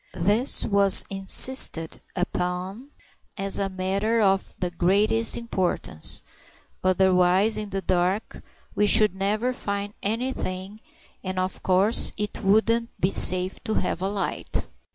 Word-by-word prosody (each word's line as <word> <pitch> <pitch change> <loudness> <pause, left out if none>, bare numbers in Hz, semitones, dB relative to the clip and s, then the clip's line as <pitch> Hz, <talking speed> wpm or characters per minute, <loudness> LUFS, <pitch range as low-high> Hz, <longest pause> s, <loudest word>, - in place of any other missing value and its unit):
This 210 +9 +3
was 200 -2 +5
insisted 195 -3 +2
upon 180 +6 -5 0.5
as 195 0 -1
a 195 -1 -2
matter 195 +4 -2
of 195 -2 -1
the 180 -1 -4
greatest 205 +6 +1
importance; 185 - 0 0.6
otherwise, 185 +2 +2
in 210 -1 -6
the 195 -1 -5
dark, 185 +4 -2 0.3
we 210 - 0
should 215 -2 +4
never 210 +6 -2
find 200 -3 -6
anything, 210 -3 -5 0.4
and 185 -1 -6
of 185 +1 -4
course 190 +4 +2
it 210 +1 -5
wouldn't 230 +4 0
be 185 - 0
safe 185 0 +4
to 220 - -3
have 180 -1 -3
a 190 - -2
light. 200 -1 -4
195 Hz, 125 wpm, -23 LUFS, 185-215 Hz, 0.6 s, was